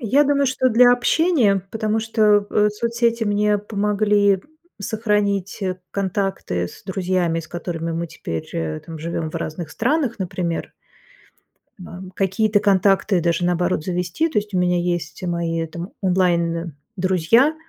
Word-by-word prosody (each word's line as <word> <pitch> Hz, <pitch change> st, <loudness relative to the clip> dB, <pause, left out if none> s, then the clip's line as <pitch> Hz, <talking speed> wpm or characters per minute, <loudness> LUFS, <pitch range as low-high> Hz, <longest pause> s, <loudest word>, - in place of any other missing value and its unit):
Я 265 Hz, +5 st, +3 dB
думаю, 280 Hz, -1 st, +2 dB
что 260 Hz, 0 st, +2 dB
для 245 Hz, +1 st, +6 dB
общения, 245 Hz, -, +2 dB
потому 220 Hz, 0 st, 0 dB
что, 215 Hz, -2 st, +3 dB
э, 210 Hz, 0 st, +3 dB
соцсети 235 Hz, +1 st, 0 dB
мне 205 Hz, 0 st, +2 dB
помогли 205 Hz, -1 st, +2 dB, 0.4 s
сохранить 205 Hz, -2 st, -1 dB, 0.3 s
контакты 190 Hz, -, -2 dB
с -, -, -15 dB
друзьями, 180 Hz, -3 st, 0 dB
с 160 Hz, -, -12 dB
которыми 170 Hz, -1 st, -4 dB
мы 170 Hz, +1 st, -2 dB
теперь, 85 Hz, -, -6 dB
э, 80 Hz, -1 st, -3 dB
там, 165 Hz, -1 st, -9 dB
живём 165 Hz, 0 st, -3 dB
в -, -, -17 dB
разных 160 Hz, +1 st, -4 dB
странах, 265 Hz, -, 0 dB
например. 180 Hz, -2 st, -3 dB, 1.1 s
Бам. 185 Hz, +1 st, -9 dB
Какие-то 205 Hz, +2 st, +2 dB
контакты 195 Hz, -1 st, +3 dB
даже, 170 Hz, +1 st, +1 dB
наоборот, 175 Hz, -2 st, 0 dB
завести. 180 Hz, -, -1 dB
То 230 Hz, -, -3 dB
есть 210 Hz, 0 st, -1 dB
у -, -, +1 dB
меня 180 Hz, 0 st, +2 dB
есть 175 Hz, -2 st, -2 dB
мои 170 Hz, -2 st, -1 dB
там 170 Hz, +3 st, -7 dB
онлайн-друзья, 180 Hz, -, +1 dB
190 Hz, 135 wpm, -21 LUFS, 170-215 Hz, 1.1 s, для